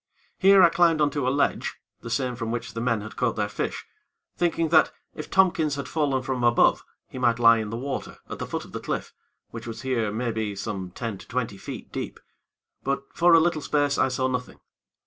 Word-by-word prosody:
Here, 195 0 +7
I 170 - +8
climbed 165 -2 +3
on 150 -1 +3
to 140 -4 -1
a - - +4
ledge 140 +2 0 0.2
the 115 - -8
same 125 +2 -1
from 115 -1 -4
which 115 0 -4
the 115 - -4
men 115 -3 +1
had 110 - -9
caught 125 -2 0
their 105 -1 0
fish, 105 - -4 0.5
thinking 165 -2 0
that, 155 -1 +5 0.2
if 155 - -8
Tompkins 170 -6 +3
had 140 - -5
fallen 140 -5 0
from 130 -2 -2
above, 120 -1 +4 0.2
he 130 - -8
might 120 -2 +3
lie 115 -1 +6
in 110 -1 -4
the 115 - -4
water 135 +3 -5
at - - -7
the - - -4
foot - - -4
of - - -15
the - - -5
cliff, - - -4 0.4
which 115 0 -8
was 115 +1 -7
here, 120 -5 0
maybe, 110 -2 -2
some 95 -2 -4
ten 105 +1 -5
to - - -13
twenty 115 -4 -2
feet - - -8
deep; - - -5 0.6
but, 140 0 -1
for 175 0 +5
a - - +8
little 160 -1 +1
space, 145 -1 +1
I - - +4
saw 130 0 0
nothing. 125 -1 -4
125 Hz, 220 wpm, -25 LUFS, 115-150 Hz, 0.6 s, I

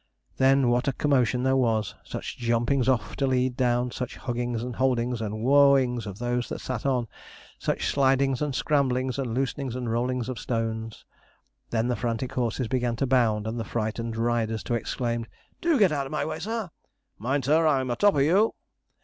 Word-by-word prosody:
Then 135 -1 +4
what 120 +2 +1
a 135 - +2
commotion 125 -3 +1
there 130 0 +3
was! 115 -5 +1
Such - - -6
jumpings 120 +3 +1
off 115 -5 0
to 135 - +1
lead 130 -1 +1
down, 125 -1 +1
such 125 0 -5
huggings 120 -2 -3
and 125 -1 -5
holdings, 125 -2 +1
and 110 0 -4
wooa 140 0 +6
ings 125 -4 -2
of 100 -1 -7
those 120 +1 -2
that - - -4
sat 130 0 -4
on, 125 -3 +1 0.5
such - - -1
slidings 135 -1 +2
and 145 -3 -1
scramblings, 130 -3 +1
and 120 -4 -2
loosenings 135 -1 -2
and 125 -3 -3
rollings 125 +1 -1
of 130 -4 -4
stones. 115 -1 -3 0.6
Then 115 0 0
the 125 - 0
frantic 120 +1 -2
horses 120 0 -1
began 125 -1 0
to 135 - 0
bound, 115 -5 +2
and 115 +2 -3
the - - -2
frightened 115 0 -3
riders 115 -1 0
to - - -3
exclaim: 115 0 -2 0.3
'Do 335 -3 +3
get 200 -7 +4
out 140 -2 -1
of - - -11
my 150 - -1
way, 155 0 -4
sir.' 215 0 -3 0.5
'Mind, 130 +5 -1
sir! 160 +3 +4
I'm 130 -4 +1
a - - 0
top 205 +6 +4
of 140 - +3
you!' 190 +9 +3
125 Hz, 190 wpm, -26 LUFS, 115-135 Hz, 0.6 s, wooa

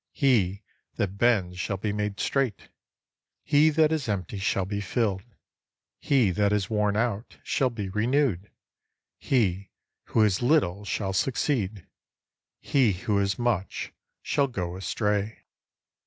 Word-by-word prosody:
He 105 -8 +2 0.3
that 100 -1 -2
bends 95 -7 +2
shall 100 +1 -2
be 100 +2 -2
made 105 -1 -3
straight. 135 -7 -1 0.7
He 150 +2 +4
that 155 0 +3
is 150 -7 -1
empty 100 -1 -3
shall 95 -1 0
be 100 +1 -3
filled. 100 -1 -1 0.8
He 125 -9 +2
that 100 +2 +1
is 105 0 0
worn 105 -1 +1
out 115 -1 -2
shall 130 - +1
be 110 -5 -5
renewed. 105 -1 0 0.7
He 100 -7 0 0.4
who 110 - +1
has 105 -2 +3
little 110 - +2
shall 95 -2 -2
succeed. 110 - -1 0.7
He 130 -7 +2
who 100 +3 -1
has 100 -1 0
much 120 -6 -2 0.3
shall 140 - +1
go 90 -8 -4
astray. 105 +2 -2
105 Hz, 130 wpm, -26 LUFS, 95-120 Hz, 0.8 s, He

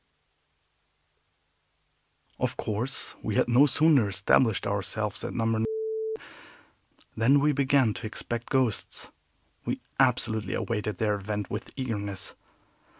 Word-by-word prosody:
Of - - -1
course 115 +5 -3
we - - -2
had - - +3
no 125 +5 +6
sooner 145 -4 +4
established 100 +3 +2
ourselves 100 +1 -2
at - - -3
No. 115 -1 +1 1.5
than 125 +6 +4
we 150 +2 +3
began 135 -4 +3
to 110 - -5
expect 115 +2 -5
ghosts. 130 -6 0 0.5
We - - -2 0.2
absolutely 115 -6 +2
awaited 105 -4 -2
their 105 -2 0
advent 105 +1 -4
with 105 - -4
eagerness. 100 -7 -4
115 Hz, 105 wpm, -28 LUFS, 105-130 Hz, 1.5 s, no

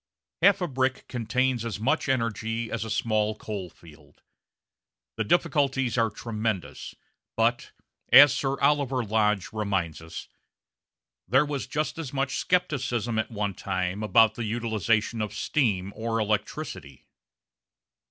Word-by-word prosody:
Half 200 +2 +5
a 180 - 0
brick 130 -2 -1
contains 125 +1 0
as 115 -3 -4
much 130 +4 0
energy 115 -2 -1
as 115 - -2
a 110 - -6
small 110 -1 0
coal 100 -4 -6
field. 80 -2 -19 0.9
The 110 - -1
difficulties 135 -3 +1
are 115 -2 +2
tremendous, 110 -2 -4 0.4
but, - - +1 0.4
as 145 -1 +9
Sir 135 -1 -1
Oliver 140 -3 +2
Lodge 105 -2 0
reminds 95 -7 -2
us, 80 +1 -8 1.0
there 135 - +4
was 145 -2 -4
just 155 +2 -2
as 145 -5 -6
much 135 -1 -1
scepticism 120 - 0
at 110 - -2
one 105 -3 -2
time 95 +1 -3
about 110 +1 +4
the 115 - -5
utilisation 110 0 0
of 105 0 -4
steam 105 - 0
or 115 0 -2
electricity. 105 - -3
115 Hz, 130 wpm, -26 LUFS, 105-130 Hz, 1.0 s, as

